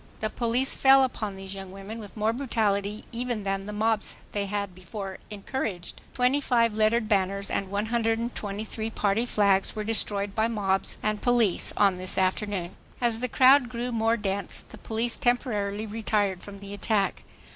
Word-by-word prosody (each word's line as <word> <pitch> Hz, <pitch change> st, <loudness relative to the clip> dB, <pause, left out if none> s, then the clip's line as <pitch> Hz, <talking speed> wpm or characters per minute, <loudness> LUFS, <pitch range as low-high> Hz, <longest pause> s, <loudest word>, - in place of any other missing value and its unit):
The 215 Hz, 0 st, -1 dB
police 245 Hz, +3 st, +2 dB
fell 270 Hz, 0 st, +6 dB
upon 215 Hz, -6 st, -2 dB
these 190 Hz, 0 st, -7 dB
young 195 Hz, -1 st, -7 dB
women 195 Hz, +4 st, -8 dB
with 210 Hz, 0 st, -10 dB
more 215 Hz, +1 st, +1 dB
brutality 215 Hz, -5 st, -1 dB
even 240 Hz, -2 st, -2 dB
than 195 Hz, 0 st, -2 dB
the -, -, -4 dB
mobs 215 Hz, +1 st, 0 dB, 0.2 s
they 200 Hz, -1 st, -2 dB
had 200 Hz, -1 st, -3 dB
before 190 Hz, +1 st, -7 dB
encouraged. 205 Hz, -3 st, -4 dB
Twenty 255 Hz, +3 st, +3 dB
five 235 Hz, -4 st, +2 dB
lettered 220 Hz, +1 st, +2 dB
banners 200 Hz, -1 st, 0 dB
and 195 Hz, -, -1 dB
123 220 Hz, 0 st, -2 dB
Party 220 Hz, +2 st, 0 dB
flags 200 Hz, -4 st, +2 dB
were 215 Hz, -, -2 dB
destroyed 205 Hz, -2 st, 0 dB
by 220 Hz, +1 st, +2 dB
mobs 195 Hz, -4 st, -1 dB
and 215 Hz, 0 st, 0 dB
police 240 Hz, -6 st, +3 dB
on 200 Hz, -3 st, +4 dB
this 185 Hz, 0 st, -3 dB
afternoon. 190 Hz, -1 st, -1 dB, 0.2 s
As 235 Hz, -2 st, +1 dB
the 250 Hz, -, -1 dB
crowd 260 Hz, +1 st, +6 dB
grew 245 Hz, 0 st, -3 dB
more 225 Hz, 0 st, +2 dB
dense, 200 Hz, -2 st, -3 dB
the -, -, -13 dB
police 230 Hz, +1 st, -2 dB
temporarily 215 Hz, -4 st, 0 dB
retired 210 Hz, -3 st, -1 dB
from 200 Hz, -1 st, -10 dB
the 200 Hz, 0 st, -8 dB
attack. 205 Hz, 0 st, 0 dB
210 Hz, 165 wpm, -27 LUFS, 200-230 Hz, 0.2 s, fell